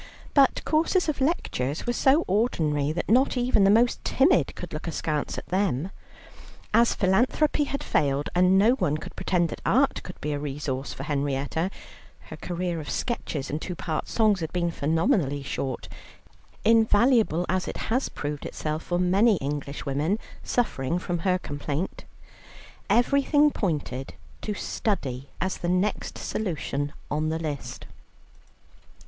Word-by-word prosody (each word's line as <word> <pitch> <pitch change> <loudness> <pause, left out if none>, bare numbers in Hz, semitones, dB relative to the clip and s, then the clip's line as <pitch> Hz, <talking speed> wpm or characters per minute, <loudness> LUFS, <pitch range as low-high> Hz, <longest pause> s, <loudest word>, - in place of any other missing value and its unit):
But 275 -2 +4
courses 335 +4 +2
of 285 -3 -2
lectures 155 - -1
were 240 - 0
so 275 +6 +3
ordinary 155 - +1
that 175 +3 -3
not 255 +4 +3
even 245 -4 +3
the 195 - +5
most 230 +4 +3
timid 280 +8 +3
could 175 - -8
look 155 +3 -5
askance 155 -2 -2
at - - -6
them. 185 -3 0 0.8
As 235 +2 +4
philanthropy 250 +10 +2
had 280 0 -4
failed, 145 -1 +1
and 180 +1 +4
no 210 +5 +5
one 155 - +1
could - - -9
pretend 175 -3 +1
that - - -7
art - - +2
could - - -10
be 150 - -3
a 145 - -2
resource 140 -2 -3
for 135 - -6
Henrietta, 145 +3 -1 0.6
her - - -5
career 175 -1 -3
of 150 -3 -7
sketches 160 - -3
and 150 +2 -3
two 180 - -4
part 155 -2 -3
songs 215 -4 +2
had 160 -1 -4
been 175 -1 0
phenomenally 160 - +1
short 130 -2 -4 0.8
(invaluable 220 - +4
as 185 +1 0
it - - -4
has 255 +4 +1
proved 145 0 -4
itself 155 +1 -3
for 175 - -2
many 195 +5 +4
Englishwomen 145 +3 -2 0.2
suffering 170 - 0
from 175 -1 -2
her 185 +2 +2
complaint) 145 +1 -4 0.8
everything 280 +4 +4
pointed 145 - -3 0.3
to 210 - -3
study 140 - -2
as 190 +1 -1
the 175 - -2
next 185 +3 0
solution 145 -7 -3 0.2
on 155 +2 0
the 160 - -1
list. 150 -4 -5
175 Hz, 145 wpm, -26 LUFS, 145-220 Hz, 0.8 s, the